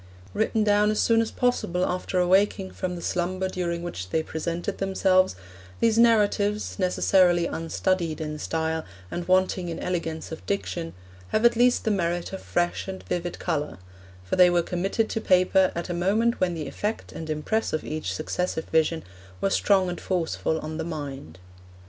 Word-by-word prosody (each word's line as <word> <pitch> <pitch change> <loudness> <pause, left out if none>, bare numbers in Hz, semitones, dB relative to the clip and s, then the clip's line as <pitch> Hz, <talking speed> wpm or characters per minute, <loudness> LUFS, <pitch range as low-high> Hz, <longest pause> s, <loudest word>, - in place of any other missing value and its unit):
Written 220 +1 +1
down 210 0 +4
as 215 - 0
soon 230 -1 +4
as 225 - -1
possible 185 -8 0
after 180 +1 -2
awaking 190 +1 +2
from 180 -1 -4
the 170 - -7
slumber 185 +2 -1
during 175 -2 -3
which 95 - -5
they 160 - 0
presented 170 +5 -4
themselves, 190 - +2 0.4
these 225 -1 +3
narratives, 210 -3 +2
necessarily 180 -1 +3
unstudied 165 0 -1
in 150 -1 -4
style, 160 0 -1 0.3
and 175 0 -4
wanting 185 -1 +2
in 165 - -4
elegance 165 -3 -3
of 160 - -7
diction, 175 -4 -3 0.3
have 215 - +1
at 235 0 +6
least 245 +1 +3
the 220 - +1
merit 175 -2 -1
of 190 - -5
fresh 175 +2 -1
and 190 -1 -6
vivid 175 -1 -3
colour; 150 -4 -2 0.5
for 90 - -2
they 180 -1 +8
were 175 -1 +2
committed 195 +6 -1
to 225 - -2
paper 185 0 +4
at 170 - -3
a 175 - -3
moment 210 +7 +1
when 180 -2 +1
the 155 -3 -4
effect 210 +10 -4
and 160 -1 -7
impress 155 +9 -1
of 155 - -2
each 155 -11 -3
successive 160 - -2
vision 160 0 +2 0.4
were 195 - 0
strong 195 -2 +3
and 175 - -4
forceful 165 -3 -1
on 155 0 -5
the - - -1
mind. 140 - -6
180 Hz, 175 wpm, -26 LUFS, 165-195 Hz, 0.5 s, they